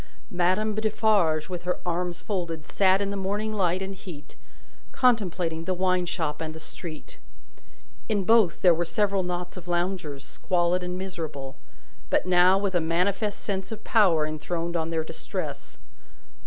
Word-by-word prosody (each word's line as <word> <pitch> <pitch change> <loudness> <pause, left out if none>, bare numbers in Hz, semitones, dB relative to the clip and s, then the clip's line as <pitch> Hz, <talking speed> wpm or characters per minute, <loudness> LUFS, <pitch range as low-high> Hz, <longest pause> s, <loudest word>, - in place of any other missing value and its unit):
Madame 185 +5 +2
Defarge, 210 -8 +2
with 180 -2 -5
her 180 0 -1
arms 175 0 -1
folded, 170 -6 -3
sat 195 0 +3
in 200 - -2
the - - -3
morning 205 +3 -2
light 185 -2 +1
and 195 +1 -4
heat, 180 -6 -11 0.6
contemplating 180 -9 +1
the 185 0 0
wine 185 -1 +1
shop 160 -4 -2
and 155 -1 -4
the - - -7
street. 160 0 -8 0.9
In 205 -3 +1
both, 220 -4 +4
there 180 -2 +7
were 170 +1 0
several 200 +2 +1
knots 180 0 -4
of 180 -1 -9
loungers, 175 -5 -2
squalid 180 0 0
and 180 0 -3
miserable, 160 -8 -5 0.5
but - - +2
now 180 +1 +5
with 195 -1 -1
a 175 - +2
manifest 190 +6 0
sense 190 -1 -3
of 220 -1 -6
power 180 -9 +4
enthroned 165 +2 -3
on 160 -1 0
their 165 -1 0
distress. - - -5
180 Hz, 155 wpm, -26 LUFS, 165-195 Hz, 0.9 s, there